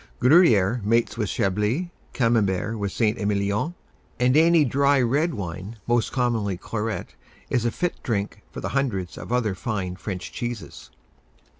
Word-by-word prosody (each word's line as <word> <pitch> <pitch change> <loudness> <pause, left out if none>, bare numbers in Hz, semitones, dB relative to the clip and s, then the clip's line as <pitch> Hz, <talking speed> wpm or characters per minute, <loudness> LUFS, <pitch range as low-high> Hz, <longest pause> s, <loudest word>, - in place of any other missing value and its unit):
Gruyère 120 - +5
mates 115 +1 +2
with 110 -4 -2
Chablis, 105 - 0 0.2
Camembert 110 -3 +1
with 100 -1 -2
St. 110 +1 0
Emilion; 100 - 0 0.4
and 125 +2 +3
any 165 0 +5
dry 140 +2 +3
red 140 +6 +1
wine, 95 +3 -6
most 120 -1 +1
commonly 115 -7 0
claret, 110 +3 -4 0.4
is 120 -1 +1
a 120 - +2
fit 175 +7 -3
drink 105 -2 -2
for - - -7
the - - -3
hundreds 110 -10 -1
of - - -8
other 120 -5 +1
fine 95 -4 -3
French 95 -1 -6
cheeses. 120 -3 -6
115 Hz, 145 wpm, -24 LUFS, 100-125 Hz, 0.4 s, Gruyère